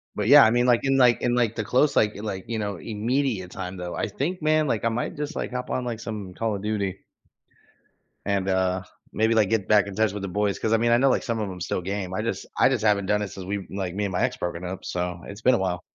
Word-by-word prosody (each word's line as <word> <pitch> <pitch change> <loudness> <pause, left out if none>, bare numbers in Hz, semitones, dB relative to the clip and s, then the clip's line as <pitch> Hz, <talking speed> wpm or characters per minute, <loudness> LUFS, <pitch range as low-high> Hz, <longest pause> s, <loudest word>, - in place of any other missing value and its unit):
But, 105 0 -1
yeah, 145 +2 +9
I 110 - +5
mean, 120 +1 +2
like, 120 -2 +4
in, 135 0 +2
like 125 -2 +5
in, 120 0 +1
like, 115 -2 +1
the 110 - -2
close, 130 +6 +2
like 105 -1 +3
like, 95 -3 -5
you 115 -1 -2
know, 100 -2 -2
immediate 110 -1 -2
time, 90 0 -6
though, 90 -1 -5
I - - -1
think, 155 - -3
man, 155 0 +2
like, 115 -3 -1
I 115 - +2
might 115 +2 -3
just, 150 +2 -4
like, - - -3
hop 125 0 -4
on, 125 - -2
like, 115 -2 -4
some 105 -5 -6
Call 110 0 -1
of 100 - -6
Duty. 100 -3 -2 1.2
And, 100 -1 0
uh, 95 0 +1 0.3
maybe, 110 +1 +2
like, 105 -3 +3
get 110 -4 0
back 105 -2 +4
in 100 - -7
touch 110 -2 +1
with 105 - -5
the 95 - -3
boys, 100 +1 0
'cause, 110 0 0
I - - +5
mean, 115 +1 +2
I 120 - +6
know, 135 +2 +4
like, - - +1
some 115 -2 -2
of 105 -2 -2
'em 90 -1 -8
still 90 - -2
game. 95 0 -4
I 105 - -1
just 115 - -3
I - - +5
just 120 -5 -1
haven't 100 -3 +2
done 105 0 +2
it 100 - -3
since 95 -1 -8
we, 100 0 -4
like 95 -2 -4
me 105 0 -1
and 95 - -3
my 90 - -1
ex - - 0
broken 85 0 -4
up, 90 +1 -6
so 90 -1 -3
it's 100 +2 -9
been 125 +1 +4
a - - +2
while. 90 -2 -2
105 Hz, 285 wpm, -25 LUFS, 95-120 Hz, 1.2 s, yeah